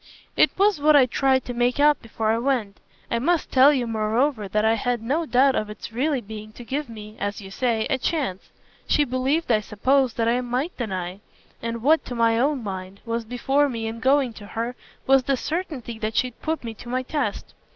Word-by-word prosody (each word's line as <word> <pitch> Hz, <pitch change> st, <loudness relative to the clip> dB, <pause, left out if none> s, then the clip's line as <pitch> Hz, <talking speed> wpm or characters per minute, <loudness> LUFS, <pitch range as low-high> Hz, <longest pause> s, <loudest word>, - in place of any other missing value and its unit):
"It -, -, +5 dB
was 395 Hz, -5 st, +3 dB
what 305 Hz, +1 st, +5 dB
I 275 Hz, -3 st, +7 dB
tried 260 Hz, +1 st, +1 dB
to 245 Hz, -, -4 dB
make 245 Hz, +3 st, +1 dB
out 295 Hz, 0 st, +4 dB
before 225 Hz, -1 st, -1 dB
I 225 Hz, -, +1 dB
went. 235 Hz, -6 st, -1 dB, 0.3 s
I 235 Hz, -, +1 dB
must 335 Hz, +6 st, 0 dB
tell 265 Hz, +2 st, +7 dB
you 260 Hz, -4 st, 0 dB
moreover 225 Hz, +1 st, 0 dB
that 210 Hz, +3 st, 0 dB
I 220 Hz, -, +4 dB
had 240 Hz, +2 st, -1 dB
no 305 Hz, +7 st, -1 dB
doubt 265 Hz, +1 st, +4 dB
of 215 Hz, -3 st, -2 dB
its 210 Hz, +2 st, -8 dB
really 270 Hz, +2 st, 0 dB
being 215 Hz, 0 st, -9 dB
to 240 Hz, -, -10 dB
give 275 Hz, +3 st, -3 dB
me, 215 Hz, -1 st, -10 dB
as 205 Hz, 0 st, -3 dB
you 195 Hz, -2 st, -10 dB
say, 230 Hz, 0 st, 0 dB
a 265 Hz, -, 0 dB
chance. 260 Hz, -, -2 dB, 0.4 s
She 295 Hz, -, +3 dB
believed, 265 Hz, +3 st, 0 dB
I 220 Hz, -, +4 dB
suppose, 255 Hz, +5 st, +1 dB
that 230 Hz, -1 st, 0 dB
I 240 Hz, +2 st, +2 dB
MIGHT 255 Hz, +7 st, -2 dB
deny; 185 Hz, -5 st, -4 dB, 0.4 s
and 230 Hz, 0 st, -4 dB
what, 315 Hz, +4 st, +4 dB
to 245 Hz, -, -6 dB
my 230 Hz, -1 st, +3 dB
own 275 Hz, -1 st, +1 dB
mind, 190 Hz, -1 st, -6 dB
was 230 Hz, 0 st, -2 dB
before 270 Hz, +5 st, +1 dB
me 230 Hz, -3 st, -4 dB
in 225 Hz, +1 st, -4 dB
going 265 Hz, 0 st, +2 dB
to 205 Hz, -2 st, -11 dB
her 230 Hz, +4 st, -4 dB, 0.3 s
was 270 Hz, 0 st, +5 dB
the 270 Hz, +1 st, 0 dB
certainty 290 Hz, -8 st, -4 dB
that 215 Hz, 0 st, -3 dB
she'd 250 Hz, +1 st, -1 dB
put 320 Hz, -2 st, -2 dB
me 230 Hz, -1 st, -5 dB
to 240 Hz, +2 st, -11 dB
my 255 Hz, +1 st, -1 dB
test. 255 Hz, -6 st, -3 dB
245 Hz, 215 wpm, -24 LUFS, 220-275 Hz, 0.4 s, I